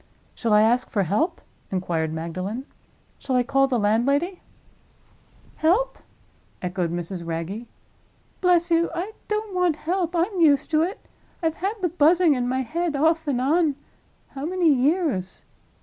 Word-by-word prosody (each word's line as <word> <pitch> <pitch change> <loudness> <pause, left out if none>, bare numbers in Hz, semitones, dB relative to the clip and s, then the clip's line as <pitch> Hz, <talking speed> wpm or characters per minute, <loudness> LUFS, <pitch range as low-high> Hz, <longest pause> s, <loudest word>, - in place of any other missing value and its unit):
"Shall 230 - -2
I 210 0 +6
ask 240 +3 +2
for 200 - +1
help?" 215 - 0 0.3
inquired 170 -4 -1
Magdalen. 185 +10 -4 0.5
"Shall 260 - -2
I 250 - +3
call 270 +1 +2
the 255 -2 0
landlady?" 275 - +1 1.2
"Help?" 390 +11 +1 0.6
echoed 180 -2 -2
Mrs. 175 +1 -4
Wragge. 170 +8 -4 0.7
"Bless 350 -2 +3
you, 335 +1 +3
I 365 +5 -3 0.2
don't 425 -1 -2
want 360 -3 +2
help! 350 +2 -2
I'm 360 +3 0
used 295 -4 +4
to 310 0 +3
it. 375 +8 -3 0.4
I've 320 -1 0
had 395 +5 -2
the 355 - +2
Buzzing 335 0 +4
in 250 -2 -1
my 260 +1 0
head, 335 +5 -2
off 320 +2 +2
and 265 -4 0
on—how 285 -1 -2
many 340 -1 +3
years?" 270 - 0
285 Hz, 145 wpm, -24 LUFS, 215-345 Hz, 1.2 s, I